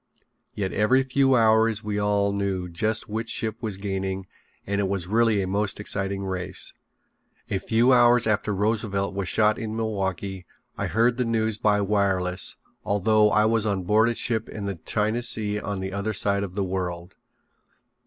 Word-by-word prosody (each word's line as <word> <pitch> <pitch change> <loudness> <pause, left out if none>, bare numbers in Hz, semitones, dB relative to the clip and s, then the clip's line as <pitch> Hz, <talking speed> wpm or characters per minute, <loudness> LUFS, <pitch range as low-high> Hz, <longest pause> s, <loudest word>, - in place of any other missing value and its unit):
Yet 95 -2 -2
every 130 +6 +3
few 135 0 +2
hours 110 -1 +3
we 105 -1 -2
all 100 -1 +1
knew 100 -2 -2
just 110 +6 -1
which 110 +2 -4
ship 110 -1 -2
was 105 -5 -3
gaining 95 -1 -3 0.4
and 100 +1 -1
it 100 - 0
was 95 -3 -1
really 110 0 +2
a - - -3
most 100 +2 -1
exciting 100 -1 -2
race. 90 -2 -3 0.8
A 95 - 0
few 120 +5 +3
hours 120 -1 +5
after 110 -1 0
Roosevelt 100 -1 -1
was 100 -2 -3
shot 110 0 +2
in 110 -1 -4
Milwaukee 95 -4 -3 0.3
I - - -2
heard 120 +2 +2
the 125 - +1
news 110 -2 -1
by 105 -1 +2
wireless 95 -3 0 0.3
although 105 +1 +3
I 105 +1 +3
was 110 -1 +2
on 100 -3 -1
board 110 +5 +3
a 120 - -2
ship 110 -2 -1
in 105 -2 -6
the 100 -1 -4
China 110 +2 0
Sea 105 -3 0
on 100 -2 -4
the 95 0 -4
other 100 +2 -2
side 100 0 +2
of 95 -2 -5
the 100 - 0
world. 90 -1 -4
105 Hz, 175 wpm, -25 LUFS, 95-110 Hz, 0.8 s, hours